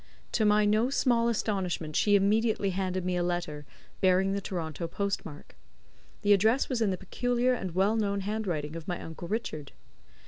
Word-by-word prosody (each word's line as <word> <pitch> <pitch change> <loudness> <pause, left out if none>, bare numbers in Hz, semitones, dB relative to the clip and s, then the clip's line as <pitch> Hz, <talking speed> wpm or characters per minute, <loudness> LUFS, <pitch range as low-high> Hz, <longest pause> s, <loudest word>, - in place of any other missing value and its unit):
To 215 - +1
my 210 0 +4
no 215 +4 +3
small 240 -4 +2
astonishment 185 -8 -2
she 205 -1 +4
immediately 205 0 +2
handed 185 -1 -2
me 180 0 0
a - - +1
letter, 175 -5 -3 0.3
bearing 190 +1 +3
the 200 - -2
Toronto 170 -3 -4
post 200 +3 -2
mark. 145 -2 -11 0.7
The 205 - +6
address 220 +7 +3
was 250 -4 -1
in 220 - +3
the 185 - -1
peculiar 245 +6 0
and 190 -8 -4
well 195 +4 +3
known 200 -2 0
handwriting 185 -7 -3
of 165 -1 -7
my 175 -2 -2
uncle 165 +1 -8
Richard. 165 -9 -4
195 Hz, 175 wpm, -29 LUFS, 175-220 Hz, 0.7 s, The